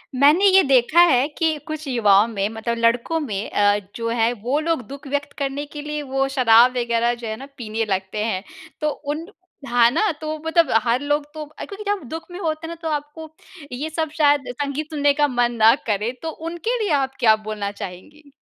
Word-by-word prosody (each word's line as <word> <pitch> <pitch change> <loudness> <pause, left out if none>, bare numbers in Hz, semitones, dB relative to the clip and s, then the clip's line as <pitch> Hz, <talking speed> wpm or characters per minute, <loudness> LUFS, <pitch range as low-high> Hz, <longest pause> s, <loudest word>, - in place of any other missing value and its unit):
मैंने 295 +9 +5
ये 385 0 +7
देखा 270 +4 +3
है 260 -4 +3
कि 320 -2 +1
कुछ 310 -1 -6
युवाओं 210 -4 +4
में 205 -3 -2
मतलब 225 +1 -3
लड़कों 235 +8 +1
में 210 -9 -4
अ, 205 0 +3 0.2
जो 230 -1 -3
है 230 0 +1
वो 275 +5 +1
लोग 325 -3 -1
दुःख 275 +1 -10
व्यक्त 285 +1 -3
करने 280 +1 -3
के 295 0 -8
लिए 300 0 -4
वो 270 -1 -1
शराब 240 0 +6
वग़ैरह 235 0 +1
जो 235 -1 -7
है 220 - -3
ना 270 - -9
पीने 225 -1 -3
लगते 190 +1 -2
हैं। 195 -4 -2 0.4
तो 300 - +1
उन 300 +3 -5 0.4
हाँ, 240 -1 +4
ना 345 - +1
तो 310 0 -3
मतलब 330 +1 +3 0.2
हर 240 +2 +1
लोग 290 0 0
तो 310 -1 -6
अ, 305 +1 -9
क्योंकि 405 +1 -9
जब 410 -5 -2
दुःख 325 +1 -6
में 355 - -7
होते 320 -2 -3
हैं - - -8
ना - - -6
तो 325 - -4
आपको 300 +1 -5 0.4
ये 280 +6 -4
सब 315 0 -2
शायद 290 -3 +3
संगीत 285 +3 -4
सुनने 290 -2 +2
का 295 0 +2
मन 245 -2 +1
ना 225 +1 +8
करें, 215 +3 -1
तो 325 - -3
उनके 335 +9 -3
लिए 400 - -1
आप 265 0 -5
क्या 220 -2 +5
बोलना 215 -2 -5
चाहेंगी? 220 +10 -10
275 Hz, 210 wpm, -21 LUFS, 230-310 Hz, 0.4 s, ना